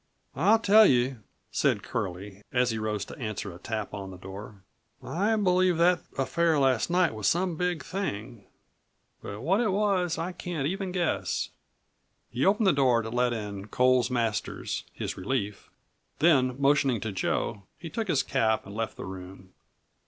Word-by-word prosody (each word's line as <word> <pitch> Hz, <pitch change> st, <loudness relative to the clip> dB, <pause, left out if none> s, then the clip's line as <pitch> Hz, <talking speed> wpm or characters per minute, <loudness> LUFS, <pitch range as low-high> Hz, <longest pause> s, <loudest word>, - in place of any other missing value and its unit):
"I'll 195 Hz, -, +5 dB
tell 215 Hz, -1 st, +6 dB
you," 125 Hz, 0 st, +2 dB, 0.3 s
said -, -, +1 dB
Curlie, 95 Hz, +2 st, -5 dB
as 125 Hz, -1 st, +2 dB
he 110 Hz, -, -3 dB
rose 105 Hz, -2 st, -2 dB
to -, -, -10 dB
answer 110 Hz, -5 st, -4 dB
a 85 Hz, -, -12 dB
tap 110 Hz, 0 st, -4 dB
on 100 Hz, -1 st, -6 dB
the 95 Hz, -, -9 dB
door, 95 Hz, +2 st, -10 dB, 0.4 s
"I 205 Hz, +7 st, 0 dB
believe 185 Hz, -4 st, +3 dB
that 175 Hz, +1 st, +4 dB, 0.2 s
affair 160 Hz, +4 st, +2 dB
last 130 Hz, -4 st, +2 dB
night 175 Hz, -4 st, +3 dB
was 110 Hz, -3 st, -2 dB
some 175 Hz, 0 st, +1 dB
big 175 Hz, -3 st, -1 dB
thing; 120 Hz, -, -4 dB, 0.8 s
but 100 Hz, +2 st, -7 dB
what 190 Hz, -, +2 dB
it 230 Hz, -, +1 dB
was 190 Hz, -4 st, +1 dB
I 170 Hz, +3 st, -2 dB
can't 175 Hz, -5 st, -4 dB
even 190 Hz, +4 st, -2 dB
guess." 165 Hz, -, -1 dB, 0.8 s
He 125 Hz, +3 st, -1 dB
opened 210 Hz, +2 st, +3 dB
the 190 Hz, -, +5 dB
door 130 Hz, -4 st, +3 dB
to 115 Hz, -, -6 dB
let 125 Hz, 0 st, +2 dB
in 105 Hz, -3 st, -5 dB
Coles 125 Hz, +1 st, +3 dB
Masters, 115 Hz, -4 st, -2 dB
his -, -, -5 dB
relief, 105 Hz, 0 st, -3 dB, 0.5 s
then 135 Hz, -5 st, +3 dB
motioning 140 Hz, -3 st, +3 dB
to 110 Hz, -, -3 dB
Joe 100 Hz, +1 st, -1 dB, 0.2 s
he 160 Hz, +2 st, -8 dB
took 225 Hz, +4 st, -2 dB
his 150 Hz, -7 st, +2 dB
cap 110 Hz, -5 st, +1 dB
and 100 Hz, -, -9 dB
left 115 Hz, 0 st, -3 dB
the -, -, -6 dB
room. 95 Hz, 0 st, -10 dB
130 Hz, 165 wpm, -28 LUFS, 105-175 Hz, 0.8 s, tell